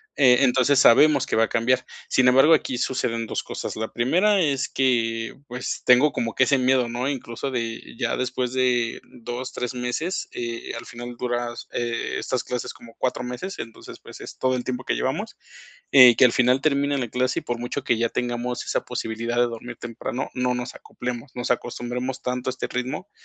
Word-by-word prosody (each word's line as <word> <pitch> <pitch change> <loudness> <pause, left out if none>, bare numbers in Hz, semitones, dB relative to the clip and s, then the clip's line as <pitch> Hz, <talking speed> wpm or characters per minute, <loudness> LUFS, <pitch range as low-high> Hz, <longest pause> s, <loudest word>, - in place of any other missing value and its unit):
Eh, 125 -3 +6
entonces, 130 +1 +4
sabemos 140 +2 +6
que - - -2
va 110 - +4
a - - -10
cambiar. 125 +2 +1 0.2
Sin 130 -1 +4
embargo, 135 +6 +6
aquí 130 -5 +1
suceden 115 -3 -1
2 - - -3
cosas. - - -5
La 110 0 -4
primera 185 - +3
es 140 -5 +1
que, 115 -3 0
pues, 125 +1 -4
tengo 130 +4 +6
como 115 -1 -2
que 130 - +4
ese 135 +1 +3
miedo, 130 -1 +3
¿no? 125 +3 -2
Incluso 130 -1 -4
de 115 -2 -3 0.2
ya - - 0
después 125 -1 -2
de 125 -2 +1
2 125 +2 -7
3 125 0 -3
meses, 125 +9 -2
eh, 120 -1 -5
al - - -8
final 120 0 -8
duras 120 -1 -3
e 120 -1 -2
estas 125 -1 -2
clases 125 -1 -4
como 115 -1 -15
4 125 - -1
meses, 125 +11 -5
entonces, 115 -1 -9
pues, - - -12
es - - -9
todo 130 0 +1
el 125 - -4
tiempo 130 0 -3
que - - -1
llevamos. - - -2 0.5
Eh, 125 -3 +9
que - - +4
al 125 - +5
final 125 +2 +3
termine 140 -1 +1
la 125 -4 -2
clase 130 +2 0
y, - - -13
por 120 -1 -3
mucho 125 +3 -4
que 120 - +1
ya 115 +1 +2
tengamos 125 0 -2
esa - - -1
posibilidad 115 +2 -3
de 120 - +4
dormir 120 +1 -5
temprano, 120 +2 -5
no 125 0 0
nos 125 0 -4
acoplemos, 125 +2 -7
nos 125 0 -1
acostumbremos 125 +1 -3
tanto 125 +1 -2
a - - 0
este 130 - -4
ritmo 125 +10 -4
125 Hz, 200 wpm, -24 LUFS, 120-130 Hz, 0.5 s, Eh